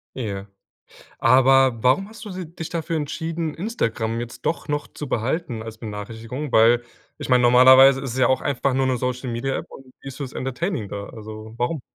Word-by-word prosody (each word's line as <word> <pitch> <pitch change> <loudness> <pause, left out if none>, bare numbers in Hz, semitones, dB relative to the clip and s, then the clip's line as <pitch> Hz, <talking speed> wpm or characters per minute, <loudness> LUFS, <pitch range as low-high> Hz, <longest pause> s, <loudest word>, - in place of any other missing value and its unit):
Ja. 100 -6 -4 0.7
Aber 130 -1 +4
warum 165 +11 +3
hast 225 0 -11
du 205 - -7
si 185 -2 -6
dich 160 - -6
dafür 165 -1 -3
entschieden, 160 +1 -3
Instagram 115 - -2
jetzt 120 -1 -7
doch 165 - -1
noch 145 0 -2
zu 150 - -8
behalten 125 0 -2
als 115 0 -8
Benachrichtigung? 115 +5 -6
Weil, 115 +2 +5 0.4
ich - - -6
meine, 125 -1 +4
normalerweise 130 +2 +7
ist 130 -4 -4
es - - -5
ja 130 - +5
auch 130 0 +1
einfach 140 -1 0
nur 130 0 +1
'ne 130 - +1
Social-Media-App 125 +1 -3
und 135 - -13 0.2
die - - -9
ist 135 - -8
fürs 140 -3 -6
Entertaining 135 - -3
da, 100 0 -6
also 110 -1 -9
warum? 125 +4 -1
130 Hz, 185 wpm, -23 LUFS, 115-145 Hz, 0.7 s, normalerweise